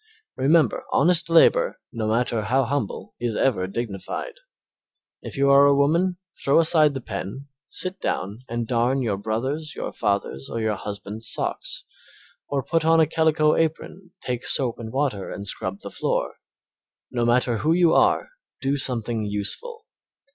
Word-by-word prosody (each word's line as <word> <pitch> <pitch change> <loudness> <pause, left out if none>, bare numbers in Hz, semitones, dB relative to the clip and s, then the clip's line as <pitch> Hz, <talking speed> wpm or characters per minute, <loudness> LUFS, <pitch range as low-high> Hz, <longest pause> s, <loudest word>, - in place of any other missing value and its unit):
Remember 145 -1 +3
honest 165 +3 +3
labor, - - +4
no 110 -3 -2
matter 115 0 +1
how 130 +5 +1
humble, 135 -3 -3
is 120 -2 -2
ever 100 -9 +1
dignified. 110 - -5 0.9
If - - -8
you 140 0 +4
are 140 +1 +7
a 140 - +5
woman 170 +6 +2 0.3
throw 140 +3 +4
aside 155 -3 +4
the 135 - -4
pen, 115 +7 -6 0.2
sit 185 +1 -2
down 100 +4 -2
and 120 0 -3
darn 125 +3 +1
your 105 -5 -1
brother's, 130 +9 -3
your - - -4
father's, 100 -10 -2
or 115 - -3
your 110 -1 0
husband's 105 +2 -5
socks, - - -3 0.6
or 140 -2 -1
put 165 +4 0
on 165 +1 +4
a 160 - +6
calico 155 -1 +2
apron, 165 +3 -2
take 125 0 -3
soap 125 -4 +1
and 110 -1 -6
water 130 -8 -1
and 100 - -6
scrub 95 -1 -3
the - - -8
floor. - - -1 0.8
No 120 -1 -1
matter 120 0 +2
who 135 +10 +1
you 170 -1 +4
are - - +3 0.3
do 140 +1 0
something 115 -4 -1
useful. 425 - -4
130 Hz, 155 wpm, -24 LUFS, 110-155 Hz, 0.9 s, are